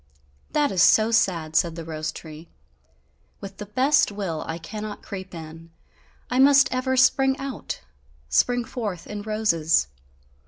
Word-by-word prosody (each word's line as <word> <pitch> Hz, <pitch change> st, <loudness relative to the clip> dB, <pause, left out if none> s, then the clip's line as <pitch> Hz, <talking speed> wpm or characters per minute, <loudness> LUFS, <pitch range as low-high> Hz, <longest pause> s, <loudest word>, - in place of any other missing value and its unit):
"That 295 Hz, -2 st, +1 dB
is 185 Hz, -, +1 dB
so 220 Hz, +5 st, +5 dB
sad," 170 Hz, -8 st, +1 dB
said 170 Hz, -1 st, +2 dB
the 165 Hz, -1 st, -7 dB
rose 155 Hz, -1 st, -4 dB
tree, 160 Hz, +1 st, -11 dB, 0.9 s
"with 195 Hz, -1 st, -9 dB
the 210 Hz, -, -8 dB
best 260 Hz, +4 st, +2 dB
will, 190 Hz, -6 st, -4 dB
I 160 Hz, -, -4 dB
cannot 210 Hz, +5 st, -7 dB
creep 190 Hz, -2 st, -8 dB
in, 165 Hz, 0 st, -10 dB, 0.6 s
I 250 Hz, -, -1 dB
must 275 Hz, 0 st, +6 dB
ever 260 Hz, +1 st, 0 dB
spring 265 Hz, +1 st, +4 dB
out, 275 Hz, -1 st, -6 dB, 0.5 s
spring 245 Hz, -, +2 dB
forth 210 Hz, -9 st, -5 dB
in 210 Hz, -1 st, -6 dB
roses. 170 Hz, -, +1 dB
205 Hz, 145 wpm, -24 LUFS, 165-250 Hz, 0.9 s, must